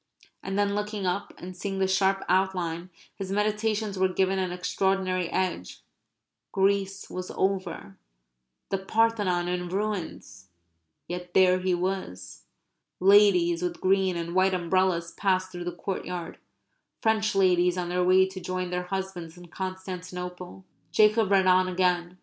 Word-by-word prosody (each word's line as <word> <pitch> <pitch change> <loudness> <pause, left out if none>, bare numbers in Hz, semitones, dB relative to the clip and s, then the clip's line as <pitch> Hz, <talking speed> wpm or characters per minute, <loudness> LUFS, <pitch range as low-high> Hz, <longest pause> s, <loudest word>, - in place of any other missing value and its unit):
And 195 0 -4
then 205 0 +1
looking 210 -1 -3
up 185 +3 -2
and 180 +1 -9
seeing 195 +1 -4
the 190 0 +1
sharp 195 0 +2
outline, 180 -2 0 0.2
his 195 -1 -6
meditations 210 0 0
were 190 - +4
given 190 +1 +1
an 185 -1 -1
extraordinary 185 0 0
edge; 180 - -3 0.7
Greece 195 0 0
was 185 0 -6
over; 185 - -2 0.7
the 195 - -1
Parthenon 200 -3 +1
in 180 0 -2
ruins; 180 - -4 0.6
yet 180 0 -7
there 185 -1 +5
he 185 -1 +1
was. 180 - -4 0.5
(Ladies 185 -3 +5
with 175 -1 -3
green 190 -1 +2
and 170 0 -4
white 185 0 +3
umbrellas 175 -1 +1
passed 185 -2 0
through 175 0 -6
the 175 - -2
courtyard 180 -1 -5 0.6
French 215 -2 +2
ladies 180 -2 +3
on 175 -1 -2
their 180 0 +1
way 185 +1 +5
to 190 0 -8
join 185 0 -3
their 180 0 -2
husbands 180 -3 -5
in 175 -1 -13
Constantinople.) 180 0 -6 0.3
Jacob 215 -1 +4
read 195 -1 +4
on 185 0 +4
again. 180 -1 0
185 Hz, 140 wpm, -27 LUFS, 180-195 Hz, 0.7 s, there